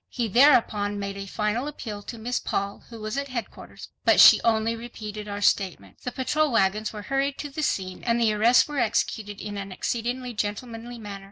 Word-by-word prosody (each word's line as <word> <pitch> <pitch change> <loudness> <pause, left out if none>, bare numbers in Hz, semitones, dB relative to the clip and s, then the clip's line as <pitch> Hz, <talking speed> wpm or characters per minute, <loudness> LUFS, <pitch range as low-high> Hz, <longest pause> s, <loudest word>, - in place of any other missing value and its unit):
He 240 -2 -2
thereupon 215 -4 +4
made 200 0 -4
a 195 0 -6
final 210 +6 -1
appeal 220 -8 -6
to 230 - -8
Miss 240 +3 -2
Paul, 200 0 -3
who 230 -1 -10
was 215 +5 -3
at 280 - -4
headquarters, 250 -3 -7
but - - +4
she - - +9
only 225 0 +1
repeated 215 -3 -7
our 205 0 -5
statement. 180 - 0
The 250 - -4
patrol 295 +4 0
wagons 210 -1 +1
were 210 -1 -8
hurried 275 +2 -1
to 290 - -5
the 310 +3 -4
scene 185 -10 -2
and 235 0 +1
the 225 -2 +3
arrests 230 +4 +5
were 295 -2 -3
executed 215 -2 -1
in 205 -1 -6
an 195 -1 -6
exceedingly 245 +5 -3
gentlemanly 225 +3 -4
manner. 205 -3 -7
220 Hz, 195 wpm, -25 LUFS, 205-245 Hz, -, she